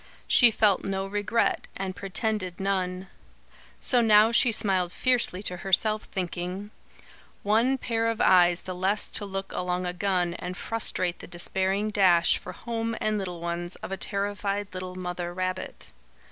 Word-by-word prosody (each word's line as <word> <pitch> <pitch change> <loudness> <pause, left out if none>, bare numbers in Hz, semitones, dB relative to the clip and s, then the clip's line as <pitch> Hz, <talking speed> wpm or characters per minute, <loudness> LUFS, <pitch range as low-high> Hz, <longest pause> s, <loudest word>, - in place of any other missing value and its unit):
She 245 - +7
felt 210 -3 +2
no 195 0 -2
regret, 205 +3 0
and 190 -1 -4
pretended 195 -2 -2
none. 190 -1 -1 0.7
So 245 -2 +2
now 215 0 +6
she 235 +1 +4
smiled 190 -5 +1
fiercely 240 -7 0
to 180 -3 -2
herself, 210 +4 +2
thinking: 185 +2 -4 0.7
"One 230 +6 +3
pair 230 -3 -1
of 230 -1 -1
eyes 175 -1 +5
the 185 - -6
less 190 +3 0
to 205 - -2
look 195 0 -5
along 180 0 -2
a 180 - -2
gun 180 -2 0
and 180 +1 -6
frustrate 185 -5 -1
the - - -10
despairing 190 +4 -1
dash 180 -5 +4
for - - -8
home 230 -1 -3
and 215 -1 0
little 180 -3 -5
ones 170 +1 -3
of - - -8
a - - -1
terrified 200 0 -2
little 185 0 -6
mother 180 -1 -4
rabbit. 185 0 -4
195 Hz, 155 wpm, -27 LUFS, 180-215 Hz, 0.7 s, She